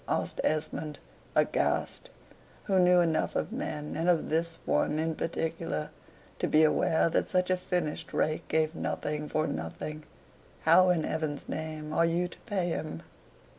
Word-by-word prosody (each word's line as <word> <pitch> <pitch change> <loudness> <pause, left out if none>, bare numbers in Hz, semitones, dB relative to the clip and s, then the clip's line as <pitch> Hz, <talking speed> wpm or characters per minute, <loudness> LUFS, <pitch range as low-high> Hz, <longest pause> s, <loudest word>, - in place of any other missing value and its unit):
asked - - -1
Esmond, 155 -1 -1 0.4
aghast; - - +1 0.5
who 190 -2 +2
knew 180 0 +6
enough 165 -2 +1
of - - -1
men, 155 - -4
and 165 +3 +1
of 165 -3 +2
this 165 +1 0
one 150 - +1
in 160 +1 0
particular, 165 0 -3 0.5
to - - +1
be 155 +1 +5
aware 160 +1 +3
that 165 - 0
such 180 0 +1
a - - +5
finished 175 -3 -2
rake 155 0 0
gave 160 0 +1
nothing 150 -2 -3
for 155 0 +1
nothing. 150 - -4 0.6
"How, 180 +3 +6
in 170 -3 +2
heaven's 155 -2 -3
name, 155 -1 -4
are 165 +2 +4
you 175 +2 +1
to - - -13
pay 190 -5 0
him?" 155 - -4
160 Hz, 155 wpm, -29 LUFS, 155-175 Hz, 0.6 s, knew